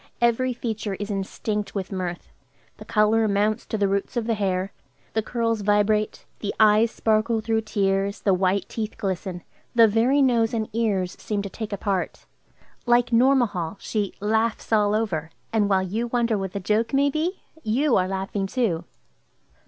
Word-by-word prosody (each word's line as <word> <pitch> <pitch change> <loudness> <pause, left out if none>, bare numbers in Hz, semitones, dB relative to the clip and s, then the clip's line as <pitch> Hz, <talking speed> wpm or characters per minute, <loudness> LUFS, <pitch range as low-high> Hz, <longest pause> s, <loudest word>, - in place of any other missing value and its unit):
Every 240 +2 +2
feature 220 -4 -3
is 205 +2 -5
instinct 205 +2 -3
with 195 0 -3
mirth; 180 -2 -4 0.5
the - - -11
color 215 +1 +3
mounts 210 +2 0
to 220 - -2
the 200 -1 +2
roots 200 +5 -2
of 235 - 0
the 230 - +1
hair; 195 -2 -1 0.4
the 220 - +1
curls 230 -1 -1
vibrate; 210 +1 +1
the 205 - -3
eyes 215 +1 +5
sparkle 220 +1 +1
through 220 0 0
tears; 200 -2 0
the 195 - +3
white 185 +1 +1
teeth 220 -1 -5
glisten; 190 -3 -3 0.3
the 230 -1 +7
very 240 +7 +3
nose 235 -3 +2
and 220 -1 -2
ears 200 -6 0
seem 205 -2 -2
to 200 - -6
take 220 +1 -6
a 200 - -2
part; 195 -2 -2 0.6
like 240 0 +3
Nourmahal, 230 -8 +2
she 205 -3 -2
"laughs 220 +2 0
all 210 -1 +3
over," 170 -8 -1 0.2
and 210 -2 +2
while 190 -1 +3
you 220 +6 -2
wonder 235 -1 +1
what 195 -2 -3
the 200 - -2
joke 220 +6 0
may 280 +1 +3
be, 335 +6 -2 0.2
you 255 +4 +2
are 185 -1 +2
laughing 195 +1 -2
too. 190 -8 -1
215 Hz, 170 wpm, -24 LUFS, 195-230 Hz, 0.6 s, the